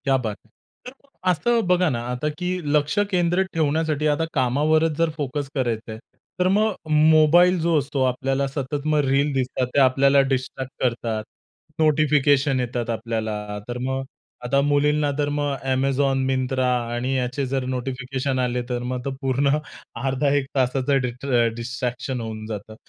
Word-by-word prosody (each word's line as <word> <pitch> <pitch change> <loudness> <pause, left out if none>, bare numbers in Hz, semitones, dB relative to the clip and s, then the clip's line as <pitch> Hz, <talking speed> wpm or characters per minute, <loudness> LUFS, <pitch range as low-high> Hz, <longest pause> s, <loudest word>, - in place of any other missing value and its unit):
क्या 135 -1 +3
बात 110 -5 -3
हैं! 110 - -28 0.4
तर - - -6 0.4
असं 230 +6 +2
बघा 180 -1 +3
ना 120 -5 -2
आता 125 +4 -2
की 180 - -3 0.3
लक्ष 150 +4 +1
केंद्रित 180 0 +1
ठेवण्यासाठी 155 -1 0
आता 150 +2 +1
कामावरच 150 +5 +2
जर 165 -1 +2
फोकस 145 -1 -3
करायचंय, 115 -4 -2 0.4
तर 180 - +3
मग 210 +3 +2 0.2
मोबाईल 160 +4 +5
जो 165 -1 +2
असतो 140 -1 -2
आपल्याला 135 +2 0
सतत 140 +1 -4
मग 150 - +3
रील 140 +2 +2
दिसतात 130 -1 -1
ते - - +5
आपल्याला 135 +1 +5
डिस्ट्रॅक्ट 130 0 -3
करतात. 115 -3 -1 0.6
नोटिफिकेशन 145 -3 +3
येतात 120 -1 -3
आपल्याला, 110 -3 -3
तर 120 0 -4
मग 130 +1 -2 0.4
आता 140 +3 +2
मुलींना 145 +1 +2
तर 145 -1 0
मग 145 -1 -1 0.2
Amazon, 135 +1 +1
मिंत्रा 130 0 0 0.3
आणि 125 +2 -1
याचे 125 +2 -1
जर 130 0 -2
नोटिफिकेशन 130 +1 -3
आले 125 -1 0
तर 120 -1 -2
मग 125 +1 -3
पूर्ण 135 +2 +2 0.5
अर्धा 135 +2 +1
एक 140 -2 +1
तासाचं 135 +1 +1
डिस्ट्रॅ 125 -1 0
डिस्ट्रॅक्शन 125 +1 -4
होऊन 110 -1 -6
जातं. 110 0 -7
135 Hz, 150 wpm, -23 LUFS, 125-150 Hz, 0.6 s, मोबाईल